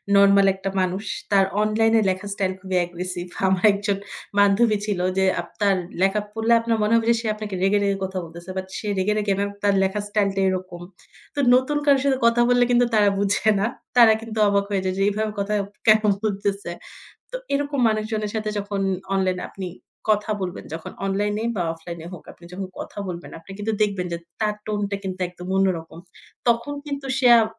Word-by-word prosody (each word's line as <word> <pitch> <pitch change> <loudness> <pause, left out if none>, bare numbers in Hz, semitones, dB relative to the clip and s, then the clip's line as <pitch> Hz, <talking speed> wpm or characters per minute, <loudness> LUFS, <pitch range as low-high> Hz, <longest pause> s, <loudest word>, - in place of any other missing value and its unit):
Normal 200 0 +6
একটা 195 0 -4
মানুষ। 185 +2 -1 0.3
তার 195 -1 +5 0.2
অনলাইনে 225 +1 +3
লেখার 190 +2 -3
স্টাইল 190 -2 -1
খুবই 190 -1 -3
অ্যাগ্রেসিভ। 175 0 -4 0.2
আমার 190 0 +2
একজন 200 0 -1 0.4
বান্ধবী 205 +2 +4
ছিল 200 -4 -1 0.2
যে 190 - +3 0.2
আপনার 200 -2 0 0.3
লেখা 195 +2 +3
পড়লে 225 +2 +1
আপনার 230 -1 0
মনে 210 - +2
হবে 230 - +2
যে - - +4
সে 230 - -4
আপনাকে 210 -2 -5
রেগে, 200 +2 +3
রেগে 200 -1 +1
কথা 190 0 -5
বলতেছে। 170 +2 -11
বাট 190 - -3
সে 210 - -6
রেগে 190 +3 +1
রেগে 205 -2 +1
না, 200 - +1 0.2
তার 200 -1 +4
লেখার 200 +2 -1
স্টাইল 205 -1 +2
টা 195 - +1
এরকম। 185 -2 -4 0.5
তো - - -2 0.2
নতুন 260 +4 +1
কারোর 275 -2 +5
সাথে 275 -2 +2
কথা 235 +1 +4
বললে 245 0 +5
কিন্তু 245 0 +4
তারা 205 -1 +5
বুঝে 205 +2 +2
না। 200 - +1 0.3
তারা 230 -2 +8
কিন্তু 225 -1 -7
অবাক 200 0 +2
হয়ে 200 -2 0
যায়। 185 - 0
যে - - -1
এইভাবে 215 +1 -1
কথা 200 +1 -1 0.3
কেন 215 0 +7 0.2
বলতেছে? 200 -3 -2 0.6
তো - - -5 0.2
এরকম 285 0 -1
মানুষজনের 215 -1 -1
সাথে 215 -1 -2
যখন 200 0 -3 0.3
অনলাইন 185 -1 +1
এ - - -5
আপনি 190 -2 -6 0.4
কথা 210 +1 +2
বলবেন। 180 -2 -5
যখন 160 - -6
অনলাইনে 205 +2 -1
বা 180 - 0
অফলাইন 170 +1 -9
এ - - -7
হোক, 180 - -10
আপনি 170 - -17
যখন 190 +1 -5
কথা - - -8
বলবেন। 175 -1 -7
আপনি 165 +4 -14
কিন্তু 215 +2 -2
দেখবেন 200 -4 +1
যে, - - -1 0.2
তার 210 -1 +1
টোন 210 -1 -1
টা 200 - 0
কিন্তু 185 -1 -5
একদম 180 0 -10
অন্যরকম। 170 -4 -1 0.5
তখন 235 +5 +1
কিন্তু 280 -1 -5
সে 255 - +4
আও 225 - +5
200 Hz, 200 wpm, -23 LUFS, 190-215 Hz, 0.6 s, তারা